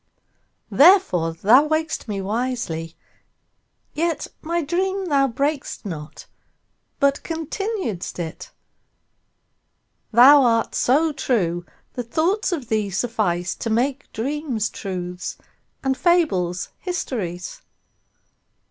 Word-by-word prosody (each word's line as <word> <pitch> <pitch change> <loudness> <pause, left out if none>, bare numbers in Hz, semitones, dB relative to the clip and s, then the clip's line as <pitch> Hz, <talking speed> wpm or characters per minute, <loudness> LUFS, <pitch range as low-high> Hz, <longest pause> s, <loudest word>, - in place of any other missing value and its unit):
Therefore 285 - +5
thou 235 - +5
waked'st 315 -2 -1
me 200 -2 -3
wisely; 205 -7 -3 1.0
yetMy 335 0 -2
dream 380 +4 -1
thou 280 -5 +3
brak'st 280 +1 -2
not, 155 -5 -7 0.7
but 280 0 +2
continued'st 330 - -4
it:Thou 240 - 0
art 230 -3 +2
so 305 +6 +2
true 175 - -1 0.3
that 245 -2 -6
thoughts 365 - +1
of 295 -9 -3
thee 215 -2 +1
sufficeTo 195 -1 -1
make 265 +5 -1
dreams 260 -3 -2
truths 180 -2 -5 0.5
and 265 -1 +1
fables 260 - +1
histories. 250 - -4
250 Hz, 85 wpm, -22 LUFS, 190-315 Hz, 1.0 s, Therefore